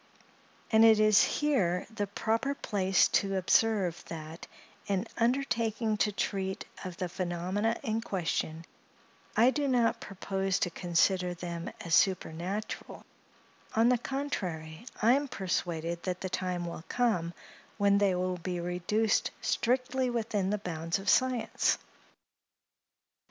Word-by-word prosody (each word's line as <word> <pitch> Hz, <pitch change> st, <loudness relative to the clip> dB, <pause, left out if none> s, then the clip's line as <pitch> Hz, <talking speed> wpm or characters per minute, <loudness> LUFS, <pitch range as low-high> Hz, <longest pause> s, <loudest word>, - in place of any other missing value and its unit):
And 220 Hz, 0 st, +6 dB
it 220 Hz, -1 st, +7 dB
is 215 Hz, -1 st, +6 dB
here 195 Hz, -13 st, +1 dB
the 205 Hz, -2 st, -2 dB
proper 225 Hz, +7 st, -1 dB
place 190 Hz, -6 st, +2 dB
to 195 Hz, -1 st, +1 dB
observe, 190 Hz, -2 st, +2 dB
that, 160 Hz, 0 st, -8 dB, 0.4 s
in 195 Hz, -2 st, 0 dB
undertaking 230 Hz, -3 st, 0 dB
to 210 Hz, -, +2 dB
treat 190 Hz, -1 st, -2 dB, 0.2 s
of 180 Hz, -2 st, -6 dB
the 185 Hz, -, -2 dB
phenomena 185 Hz, +5 st, -1 dB
in 225 Hz, -3 st, -1 dB
question, 165 Hz, -5 st, -2 dB, 0.7 s
I 235 Hz, +4 st, +6 dB
do 290 Hz, 0 st, -1 dB
not 245 Hz, -3 st, +2 dB
propose 195 Hz, -1 st, -2 dB
to 180 Hz, -, +1 dB
consider 180 Hz, +1 st, +1 dB
them 170 Hz, -1 st, -5 dB
as 170 Hz, -, -4 dB
supernatural; 185 Hz, +3 st, 0 dB, 0.7 s
on 225 Hz, +2 st, +5 dB
the 250 Hz, -1 st, +3 dB
contrary, 195 Hz, -, -4 dB, 0.2 s
I 235 Hz, +3 st, +6 dB
am 285 Hz, +2 st, +1 dB
persuaded 170 Hz, -5 st, -2 dB
that 185 Hz, -1 st, -3 dB
the 185 Hz, -, -3 dB
time 180 Hz, -1 st, -2 dB
will 170 Hz, -1 st, -6 dB
come, 180 Hz, -9 st, 0 dB, 0.4 s
when 200 Hz, -1 st, +4 dB
they 195 Hz, -3 st, +3 dB
will 180 Hz, 0 st, -1 dB
be 180 Hz, +1 st, -4 dB
reduced 180 Hz, +6 st, +1 dB
strictly 255 Hz, +1 st, 0 dB
within 215 Hz, -5 st, -1 dB
the 210 Hz, -, +1 dB
bounds 165 Hz, -3 st, -2 dB
of 195 Hz, -, -3 dB
science. 255 Hz, -2 st, +2 dB
195 Hz, 130 wpm, -30 LUFS, 175-225 Hz, 0.7 s, it